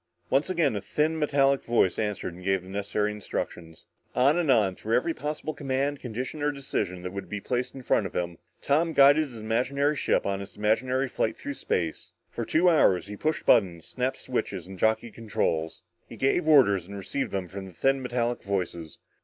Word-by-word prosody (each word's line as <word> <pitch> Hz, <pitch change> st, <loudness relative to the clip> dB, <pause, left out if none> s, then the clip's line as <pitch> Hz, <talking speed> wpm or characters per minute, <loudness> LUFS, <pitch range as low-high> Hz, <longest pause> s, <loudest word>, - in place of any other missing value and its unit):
Once 140 Hz, +6 st, +2 dB
again 165 Hz, -10 st, +1 dB
a 100 Hz, -, -2 dB
thin 150 Hz, +11 st, 0 dB
metallic 140 Hz, -2 st, +2 dB
voice 115 Hz, -6 st, +2 dB
answered 105 Hz, -4 st, -2 dB
him 85 Hz, -, -12 dB
and 90 Hz, -, -12 dB
gave 95 Hz, -2 st, +1 dB
the 95 Hz, -, -12 dB
necessary 100 Hz, +1 st, -1 dB
instructions. 85 Hz, -5 st, -6 dB, 0.3 s
On 135 Hz, +4 st, +4 dB
and 175 Hz, -4 st, 0 dB
on, 105 Hz, -7 st, +4 dB
through 110 Hz, +5 st, -1 dB
every 165 Hz, +6 st, +1 dB
possible 150 Hz, +1 st, -4 dB
command, 140 Hz, 0 st, -1 dB
condition 130 Hz, +5 st, -5 dB
or 150 Hz, 0 st, +2 dB
decision 90 Hz, -10 st, -3 dB
that 90 Hz, 0 st, -5 dB
would 100 Hz, -, -6 dB
be 105 Hz, -, -3 dB
placed 125 Hz, +5 st, -2 dB
in 135 Hz, -, -8 dB
front 105 Hz, -, +2 dB
of -, -, -14 dB
him, 85 Hz, -1 st, -3 dB, 0.2 s
Tom 160 Hz, +4 st, +2 dB
guided 145 Hz, +2 st, +6 dB
his 130 Hz, -5 st, -11 dB
imaginary 130 Hz, +7 st, 0 dB
ship -, -, +1 dB
on 100 Hz, 0 st, -1 dB
its 100 Hz, +1 st, -10 dB
imaginary 125 Hz, +5 st, +1 dB
flight 115 Hz, -, -1 dB
through 145 Hz, -, -5 dB
space. 85 Hz, -, -3 dB, 0.2 s
For 120 Hz, -, -4 dB
two 165 Hz, +8 st, +3 dB
hours 125 Hz, -, +4 dB
he 105 Hz, +1 st, -7 dB
pushed 155 Hz, +9 st, -2 dB
buttons, 90 Hz, -8 st, +3 dB
snapped 130 Hz, +1 st, -2 dB
switches 100 Hz, -8 st, -3 dB
and 95 Hz, 0 st, -10 dB
jockeyed 110 Hz, +1 st, +1 dB
controls. 80 Hz, -8 st, -2 dB, 0.3 s
He -, -, -10 dB
gave 145 Hz, +5 st, +1 dB
orders 100 Hz, -, +5 dB
and 100 Hz, +1 st, -7 dB
received 100 Hz, +8 st, -3 dB
them 95 Hz, -2 st, -3 dB
from 95 Hz, +1 st, -7 dB
the -, -, -11 dB
thin 135 Hz, +9 st, +1 dB
metallic 120 Hz, -1 st, -1 dB
voices. 90 Hz, -5 st, -3 dB
115 Hz, 200 wpm, -27 LUFS, 95-140 Hz, 0.3 s, guided